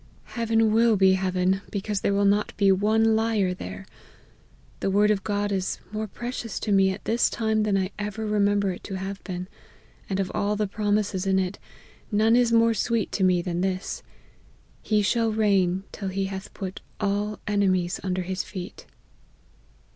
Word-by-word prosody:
Heaven 225 -2 +2
will 230 0 +4
be 190 0 +5
heaven, 185 0 +1
because 205 0 -2
there 200 - +1
will 200 0 +2
not 205 +1 +1
be 200 -1 +4
one 220 +3 +3
liar 220 -4 +1
there. 95 - -8 0.9
The - - 0
word 205 +2 +4
of 200 -2 0
God 205 -1 -1
is 190 -2 -1
more 215 0 -3
precious 240 +1 -5
to 215 - -2
me 195 -1 +5
at 190 +2 -5
this 230 +2 +2
time 220 -1 0
than 210 -2 +1
I 190 0 -1
ever 210 +1 -3
remember 205 -1 +2
it 180 - -8
to 195 - -5
have 195 +1 -5
been; 180 -1 -5 0.6
and 195 -1 -1
of 190 -1 -1
all 210 0 0
the 210 0 0
promises 205 -2 -1
in 190 0 +3
it, 190 +1 -1 0.5
none 220 +2 +4
is 245 -1 +3
more 230 0 +4
sweet 225 0 0
to 195 - -1
me 180 -2 +3
than 175 -1 -2
this 185 0 -2 0.4
' - - -32
He 210 -1 +4
shall 225 +2 +2
reign 195 -4 +2
till 195 - -5
he 195 +1 -1
hath 190 0 -6
put 190 -1 -6 0.2
all 205 0 -1
ene 205 -1 +2
mies 180 -1 -1
under 185 -1 -1
his 185 +1 -2
feet.' 185 -2 -8
200 Hz, 185 wpm, -25 LUFS, 190-215 Hz, 0.9 s, be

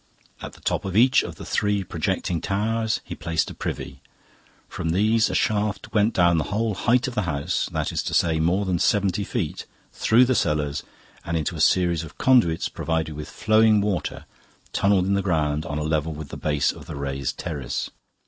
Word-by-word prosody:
At - - -7
the - - -17
top - - -1
of 95 0 -2
each 125 +3 +6
of - - -7
the - - -9
three 105 -1 0
projecting 90 0 -2
towers 110 +3 -1
he - - -7
placed 85 -1 -1
a - - -8
privy. 65 -1 -5 0.7
From 80 - -4
these 110 +6 +3
a - - -3
shaft 105 -1 -1
went 110 +1 +2
down 85 -2 +4
the 75 - -1
whole 110 +4 -1
height 125 +6 +2
of 130 - -4
the 105 - 0
house, 70 -1 -1
that - - -2
is - - -1
to - - -3
say, 80 -2 +2
more 90 +5 +1
than 90 -2 0
seventy 100 0 +1
feet, 100 -7 -4 0.3
through 120 +3 +4
the 130 - +2
cellars, 75 - 0 0.4
and 85 0 -2
into 75 - -2
a - - -3
series 85 -3 +3
of 80 - -11
conduits 115 -11 +3
provided 80 -1 -2
with 75 0 -7
flowing 110 0 +4
water 100 -3 -2 0.5
tunnelled 95 -2 +3
in 100 - +1
the 100 - +2
ground 80 -4 0
on 75 - -3
a 75 - -2
level 80 0 -1
with 75 -1 -8
the - - -7
base 75 -2 +1
of - - -12
the - - -6
raised 70 -1 -3
terrace. 75 -8 -4
90 Hz, 200 wpm, -24 LUFS, 80-105 Hz, 0.7 s, each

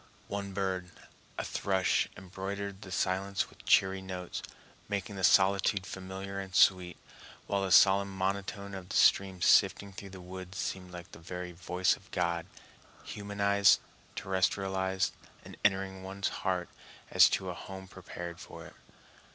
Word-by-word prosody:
One 100 0 -4
bird, 95 -2 -2 0.5
a - - -2
thrush, 95 -2 +1
embroidered 95 +2 -5
the 95 - -10
silence 95 +1 0
with - - -17
cheery 95 0 +4
notes, 90 -2 -5 0.5
making 100 +1 -3
the 95 - -5
solitude 95 +2 +4
familiar 95 +1 -6
and 95 0 -7
sweet, 90 -2 +4 0.5
while 100 0 0
the 95 -1 -2
solemn 100 +2 +6
monotone 100 +1 -3
of 95 -2 -8
the - - -4
stream 95 -2 +4
sifting 100 -1 +4
through 100 +1 -9
the 95 0 -10
woods 95 +1 -8
seemed 95 -1 -4
like 90 +1 -9
the - - -11
very 90 +2 -6
voice 90 +2 +1
of 100 - -19
God, 85 -2 -1 0.6
humanized, 100 0 +3 0.4
terrestrialized, 95 0 0 0.3
and - - -10
entering 95 -1 +1
one's 95 +1 -3
heart 90 -2 -2 0.4
as - - +7
to 95 -1 -1
a - - -5
home 95 +1 -9
prepared 85 -2 -8
for - - -10
it. - - -12
95 Hz, 145 wpm, -31 LUFS, 95-100 Hz, 0.6 s, as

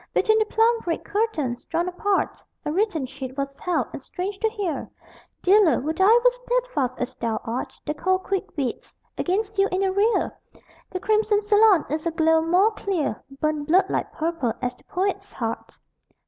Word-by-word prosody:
_ - - -52
Between 435 0 +4
the 435 - +3
plum 455 +2 +3
red 335 - -1
curtains, 325 - -1
drawn 340 +2 -1
apart, 385 +2 -1 0.2
A 300 - -1
written 355 -5 0
sheet 265 0 -8
was 275 0 -2
held.... 325 -9 0
And - - -6
strange 385 +8 -5
to 445 - +2
hear 405 -8 -3 0.5
(Dealer, 390 -3 +5
would 315 +6 -2
I - - +6
were 480 +3 +6
steadfast - - -1
as 245 - -3
thou 230 -2 -1
art) 235 +3 -3
The 300 - -1
cold 375 +5 0
quick 390 0 -3
bids. 270 -6 -4 0.2
(Against 410 +3 -1
you 390 - +5
in 370 +1 0
the 385 -1 +2
rear!) 415 +4 +1 0.5
The 370 - -4
crimson 430 +1 +2
salon, 415 -4 +5
in 305 - -1
a 335 - 0
glow 320 0 +3
more 360 +7 +3
clear 385 -8 -2 0.2
Burned 305 -1 -1
bloodlike 360 +4 +2
purple 315 -8 -1
as 250 -1 -2
the - - -25
poet's 395 +2 -2
heart. 225 -2 -5
370 Hz, 180 wpm, -24 LUFS, 300-415 Hz, 0.5 s, I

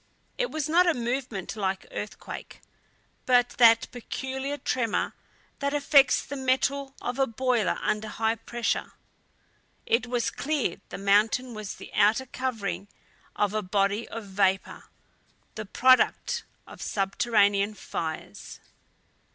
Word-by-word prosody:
It - - +1
was 310 -1 -2
not 350 +3 +4
a 330 - +2
movement 235 -5 -3
like 195 -2 -2
earthquake, - - -7 0.7
but 245 -1 +5
that 230 -1 +7
peculiar 265 +3 -4
tremor 235 -6 -1 0.5
that 280 +1 -1
affects 280 -1 +4
the 285 - -6
metal 270 +1 0
of 245 +2 -3
a 270 - +3
boiler 235 -3 0
under 215 +1 0
high 220 +1 0
pressure. 230 +1 -2 0.9
It 235 +2 +1
was 240 -1 0
clear 280 - -1
the - - -6
mountain 215 +5 +2
was 215 -2 -6
the - - -12
outer 215 +5 +3
covering 205 -8 -3 0.5
of 205 -1 +1
a 215 - 0
body 200 +3 0
of 230 0 -6
vapor, 195 0 0 0.7
the 215 -2 -6
product 260 - +3 0.2
of - - -12
subterranean 200 0 +1
fires. 160 - -6
230 Hz, 125 wpm, -27 LUFS, 205-265 Hz, 0.9 s, that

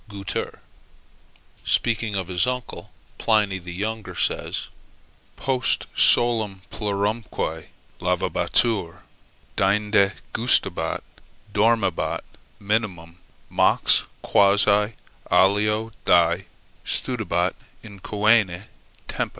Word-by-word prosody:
gouter] 100 -2 -5 1.0
Speaking 115 -3 0
of 95 -3 -2
his 90 +3 +1
uncle, 125 -1 -4 0.3
Pliny 105 -4 +2
the 90 0 -9
Younger 110 +4 -4
says - - -2 0.7
"Post 130 -2 0
solem 110 -6 +3
plerumque 100 -5 -2 0.3
lavabatur; 100 -8 0 0.5
deinde 100 0 +2 0.2
gustabat; 95 -8 +1 0.5
dormiebat 100 -7 +1 0.4
minimum; 95 -5 -2 0.3
mox, - - +3 0.2
quasi 105 +2 +3 0.3
alio 105 +3 +3
die, - - +3 0.4
studebat 95 -8 -1 0.3
in 100 -3 -12
coenæ 105 -3 +2 0.4
tempus". - - -2
105 Hz, 75 wpm, -23 LUFS, 95-110 Hz, 1.0 s, solem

